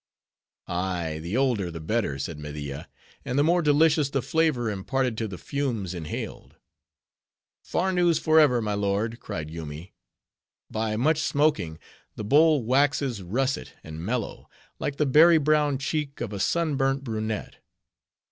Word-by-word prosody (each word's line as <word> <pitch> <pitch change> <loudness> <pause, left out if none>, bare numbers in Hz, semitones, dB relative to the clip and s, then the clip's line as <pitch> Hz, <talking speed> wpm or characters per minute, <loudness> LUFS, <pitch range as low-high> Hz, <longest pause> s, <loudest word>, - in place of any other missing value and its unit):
"Ay, 85 -3 -2
the 90 +8 -2
older 120 -9 +1
the 85 -1 -7
better," 80 -4 -1
said 75 +3 -5
Media, 75 -2 -6 0.3
"and 125 - -3
the 145 - +4
more 175 +3 +3
delicious 150 -1 +3
the 135 -2 -1
flavor 155 -7 +1
imparted 125 +5 -1
to 110 0 -2
the 95 -3 -7
fumes 120 - -3
inhaled." 80 -4 -6 1.1
"Farnoos 175 -3 +1
forever! 150 -7 +4
my 105 -1 -1
lord," 100 +3 -1
cried 80 0 -6
Yoomy. 80 +2 -8 0.8
"By 110 0 -1
much 150 +7 +2
smoking, 140 - +1 0.4
the - - -5
bowl 150 +4 +4
waxes 135 -2 +1
russet 120 - -2
and 80 +1 -8
mellow, 115 +3 -3 0.3
like 140 - -2
the 150 - +1
berry 160 +5 +7
brown 150 -2 +2
cheek 145 0 -3
of 110 -3 -4
a 100 - -4
sunburnt 135 - +1
brunette." 110 -3 -4
120 Hz, 140 wpm, -26 LUFS, 95-145 Hz, 1.1 s, berry